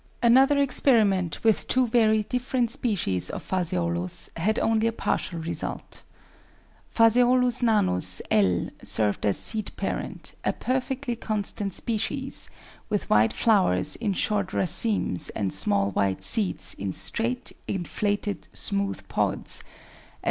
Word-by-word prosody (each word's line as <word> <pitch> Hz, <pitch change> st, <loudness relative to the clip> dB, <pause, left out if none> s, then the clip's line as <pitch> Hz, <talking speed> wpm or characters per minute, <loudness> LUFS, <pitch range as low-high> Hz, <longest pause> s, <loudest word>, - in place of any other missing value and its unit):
Another 265 Hz, +4 st, +5 dB
experiment 220 Hz, -, +2 dB
with 220 Hz, -2 st, +2 dB
two 255 Hz, 0 st, +3 dB
very 220 Hz, -2 st, +3 dB
different 250 Hz, 0 st, -1 dB
species 170 Hz, -, -1 dB
of -, -, -6 dB
Phaseolus 90 Hz, -, -1 dB
had 210 Hz, +6 st, 0 dB
only 225 Hz, 0 st, +2 dB
a -, -, +1 dB
partial 180 Hz, -5 st, -2 dB
result. 165 Hz, +1 st, -5 dB, 0.9 s
Phaseolus 245 Hz, +2 st, +4 dB
nanus, 95 Hz, -, +2 dB
L., 95 Hz, -4 st, +2 dB
served 105 Hz, -1 st, 0 dB
as 100 Hz, -, +3 dB
seed 215 Hz, -2 st, +1 dB
parent, -, -, -4 dB
a -, -, +1 dB
perfectly 255 Hz, -1 st, -2 dB
constant 205 Hz, -2 st, -3 dB
species, 260 Hz, +7 st, -2 dB, 0.4 s
with 205 Hz, -, -2 dB
white 105 Hz, +1 st, +5 dB
flowers 195 Hz, -, +2 dB
in 215 Hz, -4 st, -1 dB
short 205 Hz, 0 st, 0 dB
racemes 190 Hz, -, -1 dB
and 100 Hz, -3 st, -1 dB
small 100 Hz, +1 st, 0 dB
white 95 Hz, 0 st, 0 dB
seeds 185 Hz, -, 0 dB
in 95 Hz, -1 st, -4 dB
straight, 240 Hz, +2 st, -1 dB, 0.2 s
inflated, 205 Hz, +2 st, -2 dB
smooth 200 Hz, -1 st, -2 dB
pods; -, -, -1 dB
as. -, -, -14 dB
210 Hz, 120 wpm, -26 LUFS, -, 0.9 s, Another